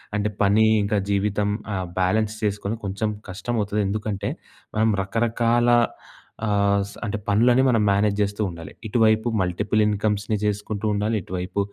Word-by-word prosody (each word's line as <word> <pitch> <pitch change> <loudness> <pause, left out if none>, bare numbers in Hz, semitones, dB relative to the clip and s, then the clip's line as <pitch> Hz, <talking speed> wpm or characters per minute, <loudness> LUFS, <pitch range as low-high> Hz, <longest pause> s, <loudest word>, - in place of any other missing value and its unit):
అంటే 105 0 0
పని 105 +2 +4 0.2
ఇంకా 105 +1 0
జీవితం 100 +1 +1 0.3
ఆ - - -1 0.2
బ్యాలెన్స్ 110 +4 +1
చేసుకొని 105 +1 -1
కొంచెం 100 +3 -1 0.2
కష్టం 105 +6 -4
అవుతది. 105 +1 -1
ఎందుకంటే 105 0 -2 0.5
మనం 110 +1 +3
రకరకాల 115 +3 +1 0.8
ఆహ్, 100 -1 +2
స - - -12
అంటే 105 +1 -2
పనులని 120 +5 +4
మనం 115 -4 +3
మేనేజ్ 100 +1 +2
చేస్తూ 100 +1 -1
ఉండాలి. 85 -2 -9 0.2
ఇటువైపు 110 0 +3
మల్టిపుల్ 100 +4 0
ఇన్కమ్స్‌ని 105 0 0
జేసుకుంటుండాలి 105 +1 -1
,ఇటువైపు 90 +2 -4
105 Hz, 135 wpm, -23 LUFS, 100-110 Hz, 0.8 s, పని